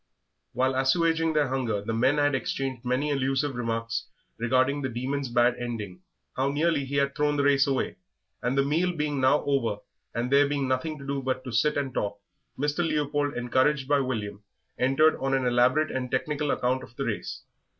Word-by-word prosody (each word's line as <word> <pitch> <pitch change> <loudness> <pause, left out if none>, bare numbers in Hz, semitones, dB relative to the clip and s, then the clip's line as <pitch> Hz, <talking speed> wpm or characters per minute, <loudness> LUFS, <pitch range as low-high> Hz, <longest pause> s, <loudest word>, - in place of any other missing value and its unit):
While 130 +2 +1
assuaging 165 +5 +2
their 150 -3 +2
hunger 125 -6 -1
the 110 +3 -4
men 130 +6 +2
had 145 0 +2
exchanged 130 -1 -2
many 130 +4 0
allusive 135 +1 0
remarks 115 -1 -2 0.3
regarding 130 +4 +2
the 130 - -2
Demon's 130 +3 -3
bad 120 +1 +3
ending, 105 -7 -5 0.3
how 135 +1 +1
nearly 150 0 +1
he 140 +2 -5
had 140 0 +1
thrown 150 -1 +1
the 140 - +2
race 140 -1 +4
away; 135 -2 -1 0.4
and 125 +2 -1
the 135 - +3
meal 170 +5 +1
being 150 -3 -1
now 130 +3 +4
over, 130 -7 +1 0.4
and 120 +2 -2
there 140 +1 +5
being 140 -2 -1
nothing 130 +5 -1
to 140 - -10
do 140 0 -2
but 130 0 -2
to 125 - -6
sit 145 +7 +2
and 135 -3 -2
talk, 100 -2 -2 0.4
Mr. 145 +3 -1
Leopold, 145 -3 0
encouraged 130 +3 +1
by 145 0 +3
William, 105 -6 -3 0.4
entered 135 +5 +4
on 135 0 0
an 130 -1 0
elaborate 125 +5 +3
and 125 -1 -3
technical 150 +1 -1
account 130 0 0
of 120 - -13
the - - -3
race. - - -4
135 Hz, 190 wpm, -27 LUFS, 125-145 Hz, 0.4 s, there